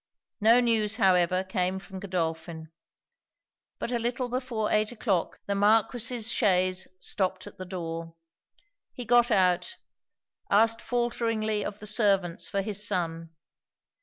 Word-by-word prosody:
No 225 +3 +6
news, 220 -3 +1
however, 185 -3 +3
came 185 0 -1
from 190 0 -9
Godolphin. 165 -3 -4 1.1
But - - -4
a 240 - 0
little 245 +2 -2
before 245 -4 -2
eight 215 +1 +1
o'clock, 210 -7 -1
the 200 - -1
Marquis's 225 +3 +2
chaise 185 -3 +2
stopped 185 -1 -1
at - - -13
the 185 - -6
door. 165 -2 -6 0.8
He 245 - -7
got 240 +1 +4
out; 185 -5 +1 0.7
asked 225 +3 +3
faulteringly 230 -3 -1
of 205 - -5
the 210 - -10
servants 200 -5 +1
for 200 -1 -1
his 205 0 -2
son. 165 -4 -1
205 Hz, 130 wpm, -27 LUFS, 185-225 Hz, 1.1 s, No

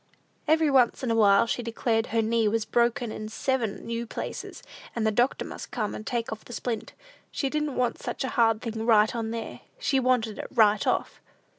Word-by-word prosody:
Every 315 -1 +3
once 260 -1 +3
in 245 - 0
a - - +2
while, 205 -1 +5
she 240 - -2
declared 230 0 -1
her 225 0 +1
knee 225 0 +2
was 220 +1 0
"broken 235 -1 +1
in 215 0 -6
seven 230 -2 -2
new 230 0 -3
places," - - -6 0.3
and 230 -2 0
the 220 - +3
doctor 245 +5 +1
must - - -8
come 215 -5 -2
and 215 - -7
take 235 -3 -2
off 220 0 -6
the 240 - -11
splint. 230 -2 -4 0.4
She 275 -2 -2
didn't 300 -2 -1
want 250 -1 0
such - - -4
a 260 - -2
hard 225 -2 +2
thing 225 -2 -4
"right 220 0 +4
on 225 -1 -2
there;" 230 0 -5 0.2
she 300 - +1
wanted 245 -4 +1
it - - -5
"right 215 -3 +3
off." - - -1
230 Hz, 205 wpm, -27 LUFS, 220-250 Hz, 0.4 s, while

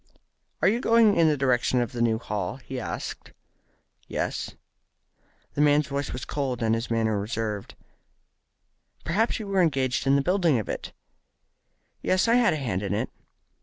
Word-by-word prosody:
"Are - - +6
you 220 +5 +3
going 230 -4 +4
in 165 -1 +4
the 150 -1 +2
direction 125 -1 +2
of 120 +1 -1
the 120 -3 -4
new 115 -1 +2
Hall?" 105 -3 -3
he 130 0 -7
asked. 115 - -6 0.7
"Yes." - - -3 1.0
The 145 - 0
man's 150 0 +4
voice 140 0 -2
was 125 - -5
cold, 130 -4 -2
and 110 0 +2
his 115 +2 -2
manner 110 -2 +1
reserved. 105 -1 -4 1.3
"Perhaps 210 +8 +1
you 220 - -6
were 195 -2 +1
engaged 135 -5 +1
in 135 - +5
the 140 - +2
building 175 -5 +2
of 110 - -3
it?" - - -5 1.1
"Yes, 185 +4 +2
I 230 - +4
had 240 -5 +4
a - - -1
hand 115 -10 -2
in 100 -3 -2
it." - - -2
135 Hz, 165 wpm, -26 LUFS, 115-170 Hz, 1.3 s, Are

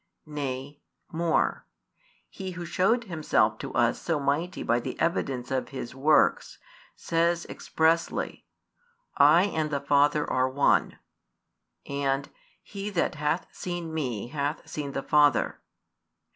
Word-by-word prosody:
Nay, 145 -1 -5 0.3
more, 165 -1 0 0.6
He 190 -2 -7
Who 175 0 -6
shewed 195 +8 +2
Himself 155 - +1
to - - -6
us 120 0 +2
so 165 -3 0
mighty 145 +6 -1
by 120 +1 +2
the 120 - -6
evidence 135 -7 -1
of 130 -1 -1
His 130 -4 -6
works, 145 +4 +2 0.4
says 170 0 0
expressly: 165 +1 -1 0.7
I 150 +5 +7
and 160 -6 -1
the 140 -2 -1
Father 145 +1 +2
are 130 0 +1
One, 140 +2 +2 0.9
and: 140 0 -1 0.3
He 200 0 -6
that 175 -5 0
hath 150 +3 -1
seen 175 -2 -5
Me 125 -8 -3
hath 145 +2 -3
seen 145 -2 -5
the 135 - -3
Father. 150 -1 +3
150 Hz, 125 wpm, -27 LUFS, 135-170 Hz, 0.9 s, I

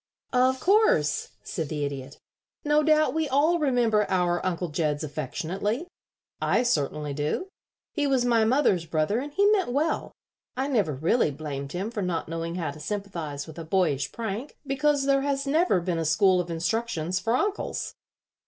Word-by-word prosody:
"Of 255 +1 +3
course," 365 - +3
said 160 -4 -4
the 150 -2 -2
Idiot. 140 -1 -6 0.5
"No 295 +1 +4
doubt 310 0 +3
we 315 -2 0
all 305 +6 +3
remember 240 -7 +2
our 175 -2 +1
Uncle 180 -1 -1
Jeds 150 0 -1
affectionately. 175 - -3 0.6
I 240 - +2
certainly 150 - -1
do. 150 - -2 0.4
He 295 -3 0
was 260 -3 +2
my 230 -2 +3
mother's 220 - +2
brother, 160 +8 +1
and 285 +3 -5
he 400 +7 +2
meant 385 -11 +2
well. 300 +5 0 0.5
I 265 +1 0
never 200 - +1
really 160 - +2
blamed 140 -1 -6
him 195 +5 -3
for 220 -4 -3
not 180 -3 -2
knowing 165 +1 -4
how 165 -5 -2
to 150 - -12
sympathize 165 -6 -4
with 160 0 -10
a - - -5
boyish 160 -6 0
prank, 230 +4 -5
because 280 +1 +1
there 275 0 +3
has 275 0 -1
never 305 - +3
been 170 -1 -2
a - - 0
school 180 +4 +4
of 175 - -8
instructions 170 0 -1
for 230 +4 0
uncles. 410 +8 -2
195 Hz, 170 wpm, -26 LUFS, -, 0.6 s, No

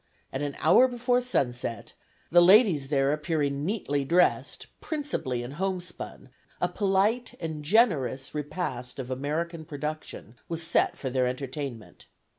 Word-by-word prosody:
At 135 - -2
an 145 -1 -3
hour 255 - +6
before 245 0 +1
sunset, 125 - -2 0.4
the 175 +1 +7
ladies 180 - +6
there 140 0 +2
appearing 150 -2 -1
neatly 155 -7 -1
dressed, 175 +6 +2 0.2
principally 285 - -3
in 120 - -7
homespun, 180 -3 -4 0.3
a - - +2
polite 205 +4 +1
and 160 -3 -5
generous 150 - +2
repast 145 -5 -4
of 130 -1 -5
American 160 +5 -3
production 150 -5 -6
was 165 0 -2
set 165 - +2
for 130 - -4
their 130 -1 +2
entertainment. 130 -2 -6
150 Hz, 130 wpm, -27 LUFS, 135-185 Hz, 0.4 s, the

